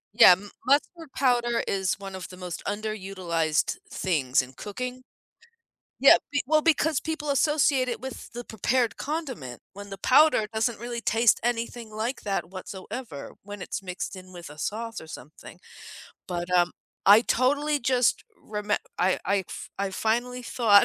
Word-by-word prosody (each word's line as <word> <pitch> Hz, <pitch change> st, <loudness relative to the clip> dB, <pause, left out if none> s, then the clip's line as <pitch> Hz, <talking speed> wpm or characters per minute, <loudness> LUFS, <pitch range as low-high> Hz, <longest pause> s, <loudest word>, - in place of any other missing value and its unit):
Yeah, 225 Hz, -6 st, +10 dB
m 200 Hz, +3 st, -5 dB
mustard 295 Hz, +3 st, +1 dB
powder 240 Hz, -3 st, +2 dB
is 190 Hz, 0 st, 0 dB
one 195 Hz, -1 st, -7 dB
of 185 Hz, -2 st, -7 dB
the 185 Hz, -, -11 dB
most 180 Hz, -3 st, -6 dB
underutilized 190 Hz, -, -1 dB
things 145 Hz, -8 st, +1 dB
in 130 Hz, +1 st, -12 dB
cooking. 250 Hz, -, -6 dB, 1.0 s
Yeah, -, -, +8 dB
b 290 Hz, -, +1 dB
well, 310 Hz, +2 st, +3 dB
because 315 Hz, -2 st, +3 dB
people 315 Hz, -2 st, -4 dB
associate 280 Hz, -3 st, +3 dB
it 240 Hz, -, -3 dB
with 265 Hz, -2 st, -8 dB
the 240 Hz, +1 st, -5 dB
prepared 230 Hz, +1 st, 0 dB
condiment, 260 Hz, -, -5 dB
when 200 Hz, +1 st, -9 dB
the 195 Hz, -, -7 dB
powder 260 Hz, +1 st, +5 dB
doesn't 220 Hz, 0 st, 0 dB
really 235 Hz, 0 st, -5 dB
taste 230 Hz, 0 st, +3 dB
anything 235 Hz, -1 st, -2 dB
like 220 Hz, +4 st, -3 dB
that 195 Hz, -4 st, -2 dB
whatsoever 185 Hz, -, -7 dB
when 205 Hz, -1 st, -8 dB
it's 205 Hz, -, -4 dB
mixed 185 Hz, +1 st, -5 dB
in 185 Hz, 0 st, -11 dB
with 175 Hz, -3 st, -9 dB
a 150 Hz, -, -12 dB
sauce 225 Hz, +5 st, -4 dB
or 160 Hz, -, -12 dB
something. 150 Hz, -1 st, -11 dB, 0.7 s
But, 175 Hz, -1 st, -4 dB
um, 175 Hz, -1 st, +4 dB, 0.3 s
I 205 Hz, +3 st, +9 dB
totally 290 Hz, +5 st, +1 dB
just 250 Hz, -1 st, +2 dB, 0.2 s
remem 210 Hz, -1 st, -1 dB, 0.2 s
I 185 Hz, +1 st, +2 dB
I 200 Hz, -1 st, +1 dB
fi -, -, -7 dB
I 195 Hz, -1 st, -1 dB
finally 240 Hz, +5 st, -1 dB
thought 225 Hz, -4 st, +5 dB
220 Hz, 160 wpm, -26 LUFS, 190-255 Hz, 1.0 s, Yeah